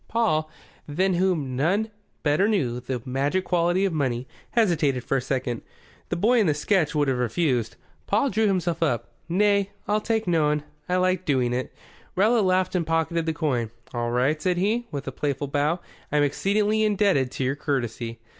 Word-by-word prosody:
Paul, 155 -10 +1 0.4
than 185 +6 +1
whom 170 -8 0
none 195 - +1 0.3
better 150 +6 +3
knew 130 - 0
the 125 0 -4
magic 140 +8 0
quality 175 +2 +2
of 190 - 0
money, 130 -4 -1 0.2
hesitated 160 - +2
for 135 - 0
a - - -1
second. 125 -2 -2 0.5
The - - -1
boy 230 +7 +3
in 210 - +3
the 150 - +2
sketch 160 0 +1
would 145 -1 +2
have 130 -2 0
refused. 125 -1 0 0.3
Paul 220 +7 +2
drew 215 +2 +2
himself 175 -4 0
up. 120 -8 0 0.2
"Nay, 200 +2 +3 0.2
I'll 210 +1 +1
take 225 0 0
noan. 150 -3 +2 0.3
I 180 - +2
liked 185 0 +1
doing 125 -4 +2
it." 125 +1 -2 0.4
Rowlatt 215 +3 +3
laughed 185 0 +2
and 175 -3 0
pocketed 165 0 0
the 160 - +1
coin. 130 -8 -1 0.2
"All 120 -1 -1
right," 130 +6 +1
said 180 +1 +1
he, 220 +6 0
with 140 -1 -5
a - - -2
playful 145 -1 -2
bow. 145 +5 0 0.3
"I'm 150 0 +3
exceedingly 205 +8 +1
indebted 200 -11 +2
to - - -2
your 130 +2 0
courtesy." 120 -5 -3
160 Hz, 180 wpm, -25 LUFS, 135-190 Hz, 0.5 s, better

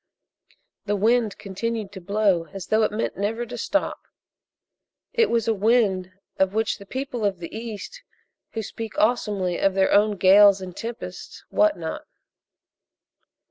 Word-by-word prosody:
The 205 0 0
wind 220 +1 +2
continued 215 +1 -4
to 190 -2 -9
blow 195 -3 +1
as 195 -2 -8
though 215 +3 +2
it 215 - +2
meant 215 +2 -2
never 220 +4 -1
to 245 +1 -8
stop. 295 +5 -1 1.1
It 465 -2 +3
was 230 -2 +1
a 225 - +3
wind 200 -4 +2 0.3
of 190 +1 +2
which 220 0 0
the 200 - -12
people 260 -1 -4
of 200 -2 +1
the 170 +3 -8
East 230 - -7 0.5
who 225 - -3
speak 225 +1 -7
awesomely 205 -5 +1
of 195 -1 +2
their 190 0 +3
own 205 0 +4
"gales" 195 +1 +7
and 185 -2 -8
"tempest" 230 +1 -7
wot 315 0 +3
not. 160 -1 -5
210 Hz, 150 wpm, -24 LUFS, 195-230 Hz, 1.1 s, gales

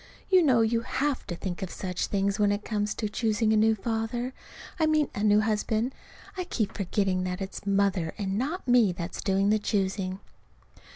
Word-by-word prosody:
You 370 -1 +7
know 260 -8 +4
you 230 +1 +2
have 270 +3 -2
to 175 - -3
think 175 0 -5
of 190 - -3
such 180 -1 -3
things 200 +1 0
when 205 -1 +4
it 205 +1 -2
comes 210 -1 -1
to 215 - -2
choosing 215 0 +1
a - - +4
new 220 +1 +4
father 230 +4 -2 0.5
I 315 - +3
mean 310 -2 +2
a 205 - -3
new 210 0 +5
husband. 220 +3 0 0.4
(I 365 -1 -3
keep 220 - -2
forgetting 190 -1 0
that 180 0 -3
it's 195 +1 -6
Mother 195 -4 +1
and 195 -2 -2
not 280 - -2
me 240 -6 +5
that's 175 0 -5
doing 195 +1 +2
the 215 - +3
choosing.) 190 -2 -1
210 Hz, 190 wpm, -27 LUFS, 195-230 Hz, 0.5 s, You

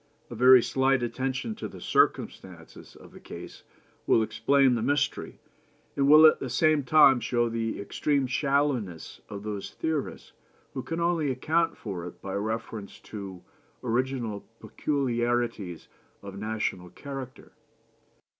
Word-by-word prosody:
A - - -6
very 125 +1 +7
slight 135 -1 +1
attention 130 - -2
to 215 - -6
the 95 - -11
circumstances 85 -1 -1
of - - -15
the - - -13
case - - -10 0.5
will 115 - +4
explain 130 +5 +3
the 115 - -1
mystery, 145 +3 -1 0.6
and 140 0 +2
will 155 +2 +9
at 155 - +6
the 130 - -4
same 155 +4 +3
time 135 -1 +6
show 120 0 0
the 115 -1 -3
extreme 140 +7 0
shallowness 130 - -1
of 100 0 -7
those 105 -2 -5
theorists 160 -3 -4 0.4
who 130 - -3
can 165 +5 -4
only 170 -3 +1
account 160 +6 0
for 90 -5 -6
it 90 - -11
by 95 - -6
reference 110 0 -4
to 95 -4 -9 0.4
original 120 -3 -2 0.2
peculiarities 120 - -2 0.4
of 100 -1 -8
national 105 -4 -3
character. 135 +5 -9
125 Hz, 135 wpm, -27 LUFS, 105-140 Hz, 0.6 s, will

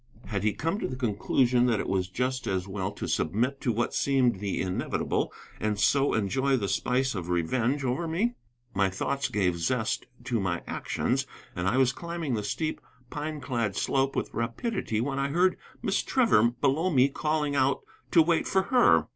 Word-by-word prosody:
Had 100 -3 -2
he 105 -1 +2
come 165 +7 -2
to - - -1
the 130 - -5
conclusion 125 +1 +2
that 115 -4 +2
it - - -2
was 95 -1 0
just 130 +5 -2
as 95 -1 -1
well 95 0 -3
to - - -5
submit 120 - 0
to 120 - +1
what 115 +2 -1
seemed 130 -7 +2
the 100 -1 -2
inevitable 90 -1 -1 0.3
and 105 -1 0
so 140 +6 +3
enjoy 130 +6 +1
the 100 -5 -1
spice 125 +7 +1
of 90 -4 -5
revenge 120 - 0
over 130 +7 -1
me? 200 +10 0 0.4
My 100 0 +2
thoughts 135 +8 -2
gave 90 -4 0
zest 110 +5 -1 0.2
to 120 -3 -1
my 90 -3 -1
actions, - - -1 0.3
and 90 +1 -1
I 110 +7 +2
was 130 -1 +4
climbing 170 -3 -4
the 110 - 0
steep, 155 +10 -2 0.3
pine 150 0 -4
clad 120 -6 -1
slope 135 0 +1
with - - -2
rapidity 115 - -2
when 135 +2 -2
I 135 - +1
heard 180 +6 +3 0.3
Miss - - +1
Trevor 225 - +4
below 145 +7 +2
me 135 -5 +5
calling 150 0 -1
out 135 0 +2 0.3
to 165 - +6
wait 165 0 +1
for 190 0 +2
her. 250 +3 +4
125 Hz, 185 wpm, -28 LUFS, 105-140 Hz, 0.4 s, to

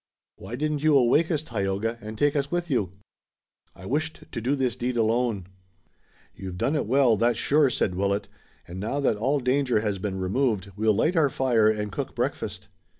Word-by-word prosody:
"Why 105 +5 -7
didn't 150 +2 -1
you 155 -2 +5
awake 135 +6 +3
us, 155 -3 -1
Tayoga, 110 -1 -2
and 110 +1 -7
take 145 +3 +2
us 140 -1 0
with 175 -1 -2
you?" 100 -8 0 0.8
"I 95 - -12
wished 155 +8 -2
to 115 - -4
do 130 +5 +1
this 130 -3 0
deed 125 0 -2
alone." 115 -3 +1 0.9
"You've 95 -1 -7
done 140 +11 0
it 145 - -1
well, 125 -2 +4
that's 120 0 +2
sure," 145 +3 +3
said 100 - 0
Willet, 100 +2 -1 0.4
"and 90 +2 -7
now 115 +8 -2
that 135 -6 +1
all 135 +7 +1
danger 125 -3 +1
has 105 -3 -2
been 95 0 -3
removed 100 0 -1
we'll 110 0 +2
light 165 - +1
our 155 -4 +4
fire 120 -5 +3
and 105 -1 -2
cook - - -5
breakfast." 100 +2 -3
120 Hz, 190 wpm, -26 LUFS, 105-140 Hz, 0.9 s, you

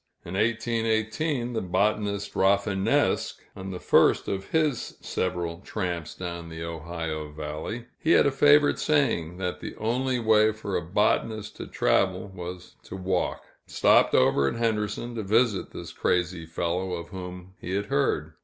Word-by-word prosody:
In 85 - -7
1818, 115 +4 0
the 115 - -1
botanist 100 +2 0
Rafinesque, 100 0 +2 0.2
on 95 +1 -7
the 90 -1 -5
first - - +4
of 95 0 -2
his 155 -6 0
several 85 -2 -2
tramps 90 -6 -4
down 85 -2 -6
the 80 0 -6
Ohio 80 -2 -5
valley, 75 +10 -5
he 160 - +3
had - - +6
a 140 - +3
favorite 145 +2 +5
saying, 110 - +1
that 90 -1 -3
the - - -7
only 125 +4 0
way 110 -2 +4
for 105 -3 -5
a 90 - +1
botanist 105 +4 0
to - - -6
travel, 100 - +1
was 90 0 -8
to - - -8
walk, 95 -1 -1 0.2
stopped - - +4
over 70 +2 +4
at - - -1
Henderson 115 0 -1
to 115 - -3
visit 110 +1 +2
this - - -8
crazy 90 -2 0
fellow 90 +3 -2
of 85 -1 -5
whom 90 -1 -8
he 95 - -4
had 100 +1 -1
heard. 70 - 0
95 Hz, 155 wpm, -26 LUFS, 85-110 Hz, 0.2 s, had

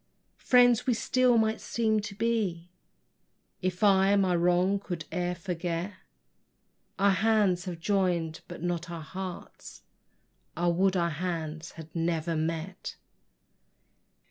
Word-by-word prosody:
Friends, 245 -1 +4
we 250 - +3
still 250 +1 +3
might 220 0 +1
seem 220 -2 0
to 205 -1 -6
be, 200 -6 -1 0.9
If 185 +1 -2
I 195 0 +5
my 190 -3 +2
wrong 180 +3 +2
could 175 -5 -6
e'er 180 -1 -1
forget; 175 +1 -3 1.0
Our 200 +1 +4
hands 200 -3 +2
have 175 -3 -5
join'd 175 -4 0
but - - -9
not 175 0 -2
our 170 -2 -6
hearts: 185 +2 -8 0.7
I 175 +1 +2
would 185 +2 +2
our 170 -1 +1
hands 160 -1 -4
had 160 0 -12
never 165 0 -1
met! 165 +3 -3
180 Hz, 120 wpm, -28 LUFS, 170-200 Hz, 1.0 s, I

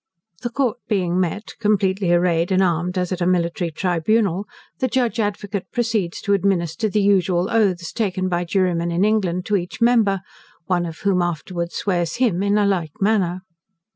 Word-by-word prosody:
The 240 - -2
court 245 -2 -1
being 185 -4 0
met, 185 +4 -2
completely 195 -4 +1
arrayed 175 0 +2
and 190 0 +4
armed 175 +1 0
as 180 0 -1
at 185 -1 -3
a 175 - +2
military 175 -1 0
tribunal, 185 +4 0 0.3
the 260 - +1
Judge 245 -3 0
Advocate 205 -2 -3
proceeds 220 -8 -1
to 200 -2 +1
administer 195 0 0
the 210 0 +1
usual 185 -2 +2
oaths 190 -7 +1
taken 185 -4 -1
by 175 -1 -1
jurymen 175 -2 0
in 175 +4 +1
England 190 -5 0
to 210 -1 +2
each 180 0 -6
member; 225 -5 +3 0.4
one 175 -2 0
of 160 -1 -9
whom 195 -2 +2
afterwards 170 0 -3
swears 175 -4 -1
him 225 -8 +1
in 200 +1 +2
a 205 - +3
like 175 -6 0
manner. 195 -3 +1
185 Hz, 170 wpm, -21 LUFS, 175-210 Hz, 0.4 s, and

